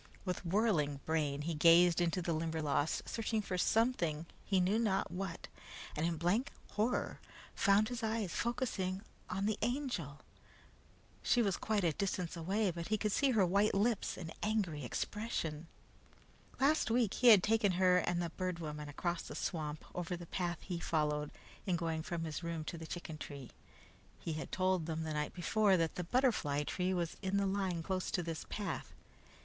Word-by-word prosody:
With 180 -1 -2
whirling 170 -7 +1
brain 150 -3 0
he 165 +2 -1
gazed 170 +2 +6
into 175 +1 +1
the 170 - 0
Limberlost, 155 -2 0
searching 225 -1 -1
for 195 -3 -3
something, 180 -6 +1 0.2
he 195 -2 +2
knew 190 +5 +2
not 205 -4 +1
what, 180 -2 -4 0.5
and 155 +2 +1
in 170 -1 -1
blank 180 - +1 0.2
horror 220 +4 0 0.3
found 200 +1 +4
his 245 -1 -4
eyes 220 -4 -1
focusing 200 -6 -1 0.3
on 195 +2 -1
the 215 -1 0
Angel. 230 - -2 1.0
She 240 - +3
was 195 -4 +1
quite 215 -3 0
a 170 - +3
distance 180 -1 -2
away, 190 +4 0
but 170 0 -5
he 215 - +1
could 210 0 0
see 280 +6 +3
her 215 -7 +4
white 200 +4 +3
lips 215 +2 +1
and 165 -2 -6
angry 195 -9 0
expression. 165 - -3 0.9
Last 290 +1 +3
week 230 -3 +2
he 250 - +3
had 210 -6 +9
taken 215 -3 +3
her 180 0 +4
and 175 -1 0
the 170 - -3
Bird 185 0 -2
Woman 150 -2 -5
across 170 +4 -2
the - - -8
swamp 155 -3 -3
over 175 0 -3
the 175 - -8
path 175 0 -2
he 175 -3 -4
followed 150 -3 0 0.4
in 180 - +2
going 165 -2 -1
from 170 0 -3
his 160 0 -4
room 170 -2 -3
to 170 - -5
the 160 - -7
chicken 160 -3 -6
tree. 140 -5 -8 0.7
He 165 - -3
had 155 - -5
told 185 -3 +1
them 160 -1 -2
the 160 -1 -3
night 150 0 -2
before, 195 +2 +3
that 165 -2 +1
the 180 - -3
butterfly 170 - +1
tree 180 +4 -1
was 175 -3 -1
on 190 +1 +1
the 200 - +2
line 190 -4 -1
close 185 +1 -2
to 180 - -1
this 165 -2 -5
path. 200 -5 -4
180 Hz, 180 wpm, -35 LUFS, 160-205 Hz, 1.0 s, had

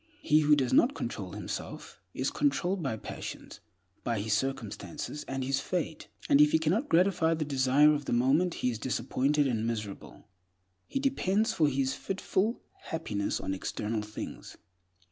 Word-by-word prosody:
He 155 -1 +5
who 150 -1 +5
does 130 -4 0
not 270 +4 +5
control - - -5
himself, - - -6
is - - -2
controlled 195 -10 0
by 135 -8 -2
passions, - - -8 0.4
by 115 -3 -1
his 105 +1 -1
circumstances, 135 - -3
and 135 0 -3
his 135 +1 0
fate; 160 +2 -3 0.2
and 140 - +6
if 150 0 +5
he - - +7
cannot 175 - 0
gratify 165 -2 +3
the 155 -1 -2
desire 140 +2 +4
of 145 -1 -2
the - - -3
moment, 140 +9 +3
he 125 - +3
is 115 - -5
disappointed 140 +3 +1
and 115 -4 0
miserable. 105 -4 -6 0.6
He 275 - -2
depends 225 -5 +1
for 155 - +3
his 135 -1 0
fitful 195 - -1 0.2
happiness 105 -11 -2
on 95 - -3
external 105 +3 -3
things. 105 0 -8
145 Hz, 160 wpm, -30 LUFS, 120-165 Hz, 0.6 s, he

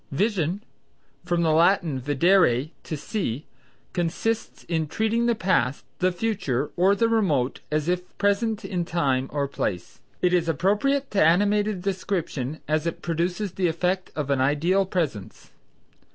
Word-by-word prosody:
Vision 190 +2 0 0.6
(from 175 -1 +1
the 160 - +3
Latin 165 -3 +3
videre, 145 0 +3
to 155 - -4
see) 150 - -3 0.5
consists 185 +6 -2
in 160 -2 -1
treating 220 +7 0
the 235 - +2
past, 165 - 0
the 185 0 +2
future, 175 - -1
or 190 +3 +4
the 230 +3 +2
remote 160 - +1
as 155 0 0
if 180 0 -2
present 210 +1 +1
in 180 -2 -2
time 135 -6 0
or 140 -1 -1
place. 90 -9 -4 0.2
It 180 0 +2
is 170 -2 +2
appropriate 210 - +1
to 200 - +3
animated 205 +3 +2
description, 175 -8 -3
as 155 +2 0
it 170 - -4
produces 175 +4 -1
the 185 0 0
effect 180 +3 -1
of 145 -2 -2
an 135 -2 +2
ideal 170 +8 +2
presence. 155 - -3
175 Hz, 145 wpm, -25 LUFS, 150-200 Hz, 0.6 s, or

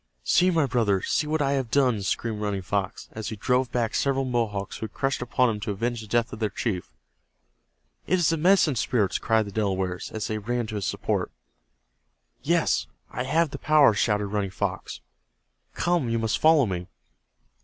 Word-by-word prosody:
"See, 180 - +4
my 165 -5 +2
brothers, 110 -7 0
see 150 - +1
what 155 -1 0
I 135 - +1
have 135 -4 -1
done!" 125 -4 +2
screamed 105 +2 -2
Running 100 -2 -2
Fox, 95 0 -3
as 110 -1 -5
he 110 - -5
drove 125 +4 0
back 120 -3 -1
several 135 -1 +1
Mohawks 110 -6 -2
who 110 - -4
had 110 - -19
rushed 135 -1 +1
upon 125 0 +2
him 105 - -4
to 110 +1 -5
avenge 115 +4 -2
the 110 - -10
death 120 +3 0
of 110 - -7
their 110 -2 0
chief. 95 - -3 1.2
"It 185 - +3
is 175 -4 +2
the 165 - +1
Medicine 175 -3 +4
Spirits!" 115 -4 0
cried 110 -2 +2
the 100 - -8
Delawares, 95 -3 -2
as 110 -1 -4
they 110 0 -2
ran 120 +3 -2
to 110 0 -6
his 100 - -3
support. - - -2 1.1
"Yes, - - +1 0.2
I 125 - -3
have 160 +2 +1
the 140 - -6
power!" 150 -6 +5
shouted 105 0 +1
Running 100 -1 -2
Fox. 95 - -4 0.7
"Come, 175 -8 +1
you 115 - 0
must 110 -1 0
follow 155 -3 +5
me!" 90 -3 -4
115 Hz, 190 wpm, -25 LUFS, 105-135 Hz, 1.2 s, power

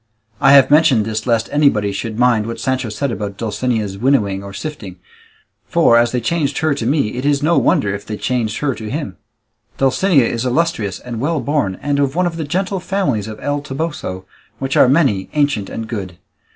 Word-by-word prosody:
I 135 - +5
have 140 -1 +6
mentioned 145 -8 +4
this 110 +1 -3
lest 115 -2 +1
anybody 115 -9 +2
should 110 +2 -5
mind 120 -3 +2
what 115 0 -5
Sancho 130 -1 -1
said 135 +5 -2
about 100 -3 -5
Dulcinea's 110 -2 -2
winnowing 105 -7 +1
or 100 - -8
sifting; 105 - -7 0.7
for, 115 - +4
as 120 0 +4
they 125 - 0
changed 145 +2 -1
her 155 -2 +1
to 120 -5 -3
me, 140 -5 +1
it 125 - -3
is 145 0 +1
no 170 +2 +3
wonder 100 -1 +1
if 100 0 -5
they 105 - -4
changed 115 -4 -1
her 145 -2 0
to 110 -2 -7
him. 130 - -4 0.6
Dulcinea 135 +1 +3
is 115 0 -2
illustrious 125 - -1
and 120 -2 -7
well 155 +3 0
born, 125 -8 -1
and 145 0 0
of 140 0 0
one 180 +1 +2
of 170 -1 -2
the 160 - -3
gentle 190 +5 -1
families 180 - -1
of 110 -1 -8
El 145 0 -1
Toboso, 135 - -5 0.3
which 135 +1 -3
are 125 - +6
many, 130 - +2
ancient, 145 -9 0
and 115 - -5
good. 95 -5 -6
125 Hz, 200 wpm, -18 LUFS, 110-145 Hz, 0.7 s, have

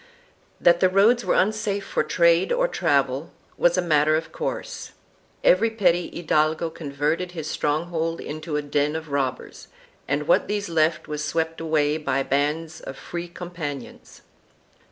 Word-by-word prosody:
2 - - -25
That 175 0 +6
the 185 - +4
roads 215 +6 +4
were - - +1
unsafe 205 -1 0
for - - 0
trade 170 0 +3
or - - +2
travel 140 - 0 0.3
was 175 +1 +3
a 180 - +2
matter 155 -2 +3
of 160 +1 -3
course; - - -5 0.5
every 215 +6 +5
petty 180 -6 +1
hidalgo 160 0 0
con 155 -3 -8
verted 155 +6 -1
his 160 -4 -5
stronghold 165 +2 -1
into 155 +1 -5
a 150 - -2
den 145 +1 0
of 160 -2 -6
robbers, 135 -2 -3 0.4
and 145 +2 -1
what - - +3
these 205 -1 -2
left 160 -1 +1
was 150 0 -4
swept 160 +2 -2
away 155 -2 +1
by 135 -3 -1
bands 150 +4 -1
of 135 - -8
Free 175 0 -6
Companions. 170 -7 -8
160 Hz, 155 wpm, -24 LUFS, 150-175 Hz, 0.5 s, That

